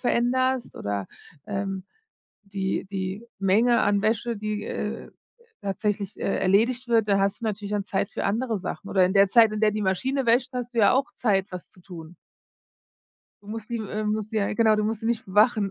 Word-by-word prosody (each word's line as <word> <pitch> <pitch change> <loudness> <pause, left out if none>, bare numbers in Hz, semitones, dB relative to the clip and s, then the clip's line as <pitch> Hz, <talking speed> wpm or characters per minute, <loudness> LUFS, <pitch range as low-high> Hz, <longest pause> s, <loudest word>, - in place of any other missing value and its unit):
veränderst 255 +1 0
oder, 100 -1 -3 0.4
ähm, 195 -2 -3 0.6
die 195 -1 -2
die 190 +2 -5 0.2
Menge 220 +5 +3
an 205 -1 +2
Wäsche, 225 +2 0
die, 210 0 -3
äh, - - -5 0.5
tatsächlich, 200 +1 -2
äh, 195 - 0
erledigt 230 +7 +2
wird, 225 -2 +3
da 200 -1 +3
hast 195 +1 0
du - - -6
natürlich 210 -1 -3
dann 205 -2 -1
Zeit 200 -1 -2
für - - -4
andere 225 0 0
Sachen 195 +1 -6
oder 190 -2 +3
in 185 +2 0
der 195 0 +6
Zeit, 225 +1 +6
in 215 - -3
der 215 -1 +4
die 215 0 -2
Maschine 260 +8 0
wäscht, 245 +3 +3
hast 245 -1 -5
du - - -2
ja 205 - +6
auch 265 +2 0
Zeit, 195 -5 +1
was 180 -2 -8
zu 185 - -19
tun. 170 -2 -11 1.3
Du 205 - -16
musst 220 0 -6
die 235 - -1
äh, 215 -1 -4
musst 215 +1 -2
die - - -2
äh, 200 - 0
ja, - - -3
genau, 220 -1 +4
du 210 - 0
musst 220 0 -2
sie 225 - -4
nicht 230 -1 0
bewachen, 210 +1 +3
210 Hz, 205 wpm, -25 LUFS, 195-230 Hz, 1.3 s, der